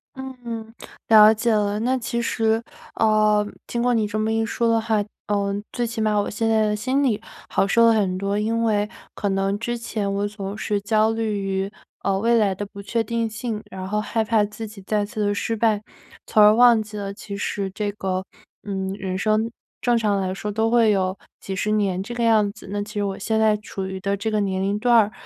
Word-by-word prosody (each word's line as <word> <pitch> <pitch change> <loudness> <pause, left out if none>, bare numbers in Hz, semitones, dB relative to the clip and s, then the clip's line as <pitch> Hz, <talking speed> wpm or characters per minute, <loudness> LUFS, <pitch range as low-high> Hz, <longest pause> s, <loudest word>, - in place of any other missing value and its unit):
嗯， 240 -4 -7 0.3
了 215 -1 +8
解 230 +2 0
了。 205 -1 +1
那 255 +3 +1
其 235 -1 -2
实 225 -1 +1 0.3
呃， 215 -1 +3 0.2
听 235 - -2
过 245 0 +2
你 220 -3 +1
这 205 - -3
么 215 +1 0
一 225 0 +1
说 235 +1 0
的 230 0 +3
话， 220 -2 +1 0.2
呃， 200 -1 0 0.2
最 240 - -1
起 230 -1 -3
码 215 -1 +2
我 205 - -1
现 225 +1 -1
在 220 -1 +3
的 210 - 0
心 260 +6 0
里 220 -6 +1 0.3
好 195 - +2
受 230 +3 +5
了 230 - +6
很 195 -4 +1
多， 200 +1 -1
因 225 +2 0
为 210 -2 +1 0.2
可 205 - -2
能 195 +1 0
之 240 +1 -2
前 215 -3 -3
我 200 +1 0
总 205 -1 -6
是 205 -2 -1
焦 215 +1 +2
虑 225 -2 -1
于， 195 0 -2 0.3
呃， 195 -1 +1
未 230 +4 +2
来 200 -4 +2
的 205 - -4
不 200 0 -10
确 230 +3 -1
定 230 +1 -1
性， 220 0 -4
然 190 -1 -6
后 210 +2 0
害 225 +1 -1
怕 220 -1 +2
自 210 +2 -5
己 210 -1 -12
再 205 +2 0
次 210 +1 -5
地 205 - +1
失 225 +2 -1
败， 215 -2 +2 0.4
从 215 - +3
而 210 +1 +7
忘 240 -1 +6
记 210 0 -8
了 200 -1 -4
其 200 0 -7
实 200 -1 -2
这 205 +2 -3
个 190 -2 -3 0.4
嗯， 190 -2 -3
人 190 -2 -4
生 215 +3 +1 0.3
正 240 -1 +2
常 210 -3 +1
来 185 -1 -1
说 210 +2 -4
都 220 +2 0
会 235 -2 +5
有 190 -2 +1 0.2
几 195 - -5
十 210 +3 -1
年 200 -3 +1
这 240 +5 -6
个 240 - -1
样 215 -3 +4
子。 210 0 -14
那 205 0 -1
其 210 +1 -7
实 205 -2 -1
我 195 -1 -3
现 220 +2 0
在 220 -1 +4
处 205 -2 -6
于 190 0 -5
的 200 +1 -1
这 220 +3 -2
个 215 - +1
年 190 -2 -1
龄 200 +1 0
段 240 +2 +3
儿， 215 -2 +4
210 Hz, 245 characters per minute, -23 LUFS, 200-225 Hz, 0.4 s, 了